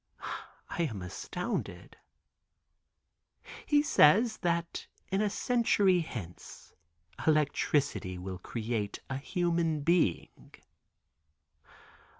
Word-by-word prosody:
I - - -2
am 100 -5 -6
astounded." 180 - -5 1.7
"He 290 -1 +4
says 220 - +5
that 170 -1 -2 0.2
in 195 +1 +2
a 210 - +2
century 205 -5 +3
hence 110 - -8 0.5
electricity 145 -10 +1
will 90 0 -6
create 110 0 -3
a 135 - -1
human 165 +1 0
being." 165 - 0
160 Hz, 80 wpm, -31 LUFS, 110-185 Hz, 1.7 s, says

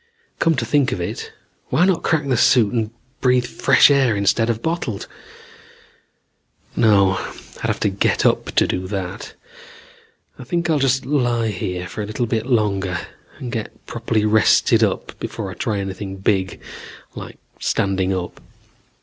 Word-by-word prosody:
"Come 165 -1 +3
to 120 - -1
think 140 +3 +2
of - - -2
it, 85 - -5 0.4
why 175 - +3
not 185 -3 +2
crack 145 -3 0
the 130 - +2
suit 120 -2 +4
and 110 -3 0 0.3
breath 125 -1 +3
fresh 130 - +4
air 135 -6 +3
instead 100 +3 +2
of 115 -1 -2
bottled? 160 - -2 1.7
"No. 100 -4 +4 0.4
I'd - - -3
have - - -1
to - - +3
get 100 0 0
up - - +3
to - - +5
do 90 0 -2
that. 95 0 -5 1.1
I - - -7
think 170 -1 -1
I'll 150 - +2
just 135 -1 +1
lie 120 -5 +1
here 90 -2 -3
a 105 - -2
little 110 +3 -2
bit 115 0 -2
longer 100 -7 +1 0.4
and 125 - -6
get 110 -2 -6
properly 115 -2 -1
rested 105 -3 +4
up - - -2
before - - -5
I - - -6
try 105 - -2
anything 95 0 -5
big 95 -1 0 0.5
like - - -9 0.2
standing 95 -1 0
up. 90 -2 -4
110 Hz, 155 wpm, -20 LUFS, 95-125 Hz, 1.7 s, to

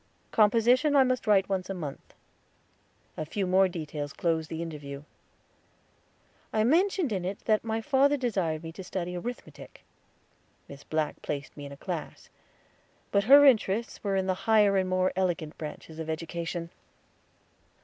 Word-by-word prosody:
Composition 240 +7 +4
I 275 - +7
must 255 -2 -1
write 195 -2 +4
once 190 -1 -2
a 195 - -3
month. 150 -6 -8 1.0
A - - -3
few 190 +6 -3
more 190 +1 +4
details 150 -4 -5
closed 160 -2 -1
the 165 +1 -4
interview. 145 -3 -7 1.5
I 215 -1 +2
mentioned 340 - +2
in 190 -3 -2
it 190 +2 -4
that 215 -1 +3 0.2
father 285 +1 +3
desired 190 - -1
me 165 - -6
to 180 +3 -9
study 180 -1 -4
arithmetic. 240 +8 -8 0.8
Miss 140 0 -11
Black 155 -1 -2
placed 145 0 -5
me 145 -1 -8
in - - -11
a 140 - -10
class; - - -6 0.8
but 200 0 +2
her 285 +4 +8
interests 230 -3 +2
were 200 -2 0
in 190 -1 +1
the 190 - +1 0.2
higher 210 -2 +5
and 190 -1 +1
more 185 0 +1
elegant 175 -4 -1
branches 155 +1 -8
of 160 0 -5
education. 170 +1 -4
185 Hz, 150 wpm, -28 LUFS, 160-220 Hz, 1.5 s, her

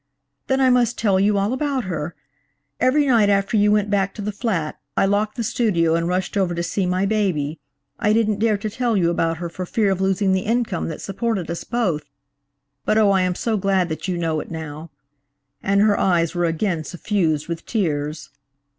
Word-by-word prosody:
"Then 265 0 +1
I 260 -1 +4
must 240 -1 +2
tell 195 -4 +2
you 205 +1 +3
all 200 +4 +1
about 275 -1 -1
her. 165 -3 -4 0.6
Every 270 +4 +3
night 230 -6 +4
after 200 +2 +1
you 210 0 +4
went 210 -1 +2
back 195 -1 +1
to 210 - -6
the 210 - -2
flat, 195 -8 -2 0.2
I - - +4
locked 205 +2 0
the 235 - -1
studio 185 -8 +1
and 165 0 +1
rushed 180 +2 -1
over 185 -3 +1
to 170 - -2
see 185 +2 -1
my 185 +2 +1
baby. 180 -8 0 0.4
I 210 -2 +2
didn't 215 -2 +2
dare 220 -1 +2
to 215 +2 -4
tell 240 -1 0
you 170 -2 +2
about 165 -1 0
her 175 +1 -4
for 170 +2 -6
fear 200 +2 +1
of 190 0 -1
losing 190 0 +2
the 190 - +1
income 225 -4 -1
that 160 - -6
supported 195 -3 -2
us 170 - -4
both; 205 -11 -1 0.8
but, 215 - +1
oh, 210 -2 +5
I 190 -1 +3
am 180 -1 0
so 225 +2 -1
glad 190 -2 +1
that 160 +3 -4
you 180 -2 -1
know 165 -2 -1
it - - -7
now," 160 0 -7 0.7
and 200 +1 +2
her 210 -1 +3
eyes 170 -3 +2
were 175 -1 0
again 165 0 -1
suffused 165 -3 -1
with 170 -1 -5
tears. 155 -8 -2
195 Hz, 210 wpm, -22 LUFS, 170-215 Hz, 0.8 s, oh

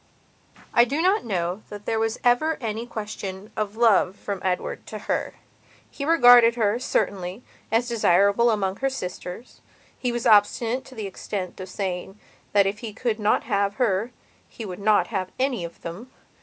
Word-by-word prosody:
I 235 - +7
do 275 +6 -1
not 375 - +2
know 180 -2 -2
that 205 0 -9
there 225 - 0
was 225 0 -1
ever 275 +7 +3
any 225 0 -4
question 210 -3 -6
of 210 -1 -3
love 205 -5 +4
from 200 -2 -5
Edward 185 -1 -2
to - - -6
her. - - -3 0.6
He 280 - -5
regarded 245 -7 +7
her, 220 -1 +1
certainly, 195 -4 -2 0.3
as 230 +2 +2
desirable 200 0 +3
amongst 200 -2 -1
her 270 - +2
sisters. 180 -2 -7 0.4
He 250 - -1
was 240 -1 -3
obstinate 225 +4 +3
to 260 - -13
the 215 -3 -5
extent 190 -1 -5
of 185 0 -7
saying 190 +1 -4 0.3
that 200 -1 +4
if 200 +2 -2
he 225 -3 -6
could 225 0 -2
not 210 0 +2
have 200 -2 0
her 220 -3 +1 0.4
he 225 - -8
would 185 -2 -7
not 210 +1 +3
have 185 -2 -1
any 255 -7 0
of 170 - -8
them. 185 +10 -7
215 Hz, 170 wpm, -24 LUFS, 195-240 Hz, 0.6 s, I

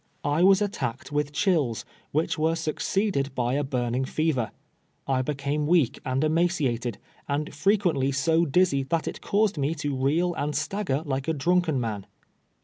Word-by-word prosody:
I 145 +3 +1
was 195 +2 +6
attacked 155 - -4
with 145 0 0
chills, 150 - +1 0.3
which 155 +3 0
were 160 +1 +1
succeeded 160 -2 -1
by 125 -1 0
a 145 +1 +1
burning 125 -2 -1
fever. 130 -5 0 0.6
I 130 -1 +2
became 145 +2 -2
weak 165 -7 +3
and 130 +2 0
emaciated, 155 - 0 0.3
and 145 +2 -2
frequently 170 -6 +2
so 160 +5 +2
diz 180 +4 +3
zy 140 -1 0
that 165 -1 0
it - - -5
caused 205 -5 +1
rae 145 +4 0
to 145 -3 -2
reel 155 +7 +1
and 150 -1 -2
stagger 155 -2 -1
like 135 -1 -2
a 160 - +1
drunk 175 +4 +2
en 140 -4 +1
man. 105 -5 -4
150 Hz, 165 wpm, -26 LUFS, 135-170 Hz, 0.6 s, was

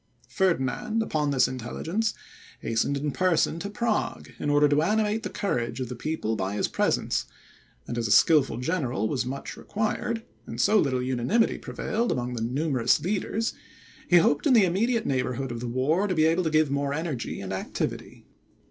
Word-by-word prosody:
Ferdinand, 190 - 0
upon 150 -8 -1
this 135 -2 +3
intelligence, 160 - -2 0.5
hastened 115 +5 0
in 145 +1 -2
person 170 -1 +1
to 200 - -4
Prague, 220 +1 -2
in 145 - -1
order 145 0 +5
to 145 +1 +3
animate 215 +4 +1
the - - -4
courage 120 - -2
of 125 -2 -3
the 125 - -5
people 120 -4 -2
by 95 0 -2
his - - 0
presence; - - 0 0.6
and 120 - -3
as 115 - -1
a - - -2
skilful 150 +3 +5
general 125 - -1
was 125 +1 -1
much 135 +2 -5
required, 220 +2 -2 0.2
and - - -7
so 215 0 +4
little 130 -5 +1
unanimity 130 - +1
prevailed 235 +2 -2
among 125 0 -2
the 115 - -4
numerous 130 +1 +1
leaders, 210 +4 -1 0.6
he 175 - +7
hoped 145 - +3
in 270 - +5
the 220 -5 +6
immediate 225 +6 +1
neighbourhood 130 -1 -1
of 120 - -4
the 120 - -4
war 145 +11 +1
to 185 - -1
be 155 -1 +4
able 165 +3 +2
to 160 - 0
give 155 -2 +2
more 140 0 0
energy 155 -6 -3
and 95 -1 -5
activity. 95 - -4
150 Hz, 180 wpm, -26 LUFS, 125-190 Hz, 0.6 s, he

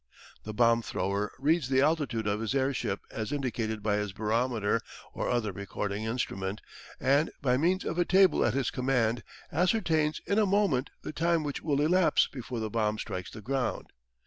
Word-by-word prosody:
The 110 - -4
bomb 115 0 +4
thrower 100 -1 -2
reads 145 0 +1
the 130 -1 +4
altitude 145 -7 +1
of 105 0 0
his 115 +4 -2
airship 130 -7 0
as 110 -1 -4
indicated 115 -6 -2
by 105 -1 +1
his 105 -2 -3
barometer 110 0 0 0.3
or - - -2
other 120 -4 0
recording 100 +2 -4
instrument, 105 -4 -2 0.4
and 140 +4 +3
by 125 -3 +2
means 175 +7 +1
of 170 - -2
a - - +5
table 190 0 +5
at 120 0 +1
his 135 -3 0
command 125 -3 +1 0.3
ascertains 160 -3 +1
in 200 - +2
a 210 - +3
moment 190 -10 +2
the - - -5
time 165 +1 +1
which 145 -2 -4
will 145 -3 +1
elapse 180 +3 +4
before 125 -2 -6
the 110 -1 -3
bomb 110 -1 0
strikes 95 -4 -5
the 110 - -10
ground. 130 +3 -2
125 Hz, 175 wpm, -29 LUFS, 110-150 Hz, 0.4 s, a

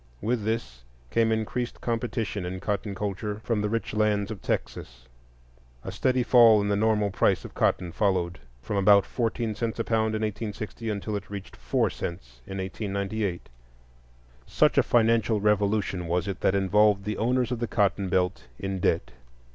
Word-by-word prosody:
With 115 - -1
this 70 - -3 0.3
came 115 -1 +2
increased 110 +2 -2
competition 115 -4 -2
in 90 +1 -4
cotton 100 0 -3
culture 105 +1 -3
from 110 -2 0
the 105 - -1
rich 115 -1 -2
lands 105 -1 +1
of 105 - -7
Texas; - - -4 0.8
a - - -5
steady 130 -1 +1
fall 115 -3 +7
in 100 0 0
the 100 - +2
normal 105 -1 +2
price 95 -2 +1
of - - -9
cotton 90 -2 0
followed, 90 -2 0 0.2
from 105 +2 -2
about 100 0 +6
fourteen 115 -2 -2
cents 115 +1 -3
a 115 - 0
pound 110 -1 0
in 110 - -2
1860 110 +1 -4
until 105 0 -3
it 100 - -6
reached 100 -2 -8
four 60 +1 0
cents - - -7
in 95 - -6
1898. 100 0 -3 1.0
Such - - +3
a - - +7
financial 115 -2 +2
revolution 100 -3 +1
was 90 +2 0
it 95 -2 -4
that 95 - +2
involved 100 +1 +3
the 105 0 -2
owners 125 +1 +1
of 125 - -2
the 120 - -1
cotton 100 -3 +1
belt 90 +1 0
in 95 -1 -3
debt. 65 - 0
105 Hz, 170 wpm, -26 LUFS, 95-110 Hz, 1.0 s, fall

